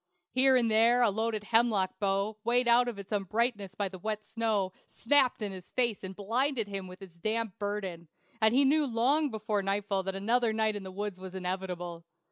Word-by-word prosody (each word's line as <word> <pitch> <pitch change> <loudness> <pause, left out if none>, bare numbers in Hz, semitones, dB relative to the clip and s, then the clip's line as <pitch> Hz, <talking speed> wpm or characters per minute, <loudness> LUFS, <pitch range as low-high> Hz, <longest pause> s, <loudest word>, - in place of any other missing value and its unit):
Here 260 +1 +4
and 235 -3 +2
there 230 +3 +5
a 225 - +4
loaded 220 0 -2
hemlock 215 -4 +1
bough, 200 +1 -1
weighed 240 +1 +2
out 240 +1 +5
of 235 -4 -4
its 200 +1 -10
uprightness 205 0 -1
by 200 0 -1
the 185 -1 -9
wet 215 +2 -4
snow, 220 -4 -1
snapped 255 -2 +2
in 205 - -2
his 185 -2 -10
face 235 -5 0
and 190 0 -6
blinded 230 +3 -1
him 195 -2 -5
with 185 +2 -11
its 170 -3 -14
damp 220 0 -2
burden; 195 -5 -4 0.3
and 220 0 +5
he 270 +4 +4
knew 295 +2 +3
long 270 +6 +2
before 215 -2 -2
nightfall 195 0 -1
that 195 0 -4
another 225 +3 +1
night 220 -1 +1
in 205 - -4
the 190 -1 -8
woods 200 -1 -5
was 190 0 -9
inevitable. 180 -2 -4
210 Hz, 200 wpm, -30 LUFS, 195-235 Hz, 0.3 s, there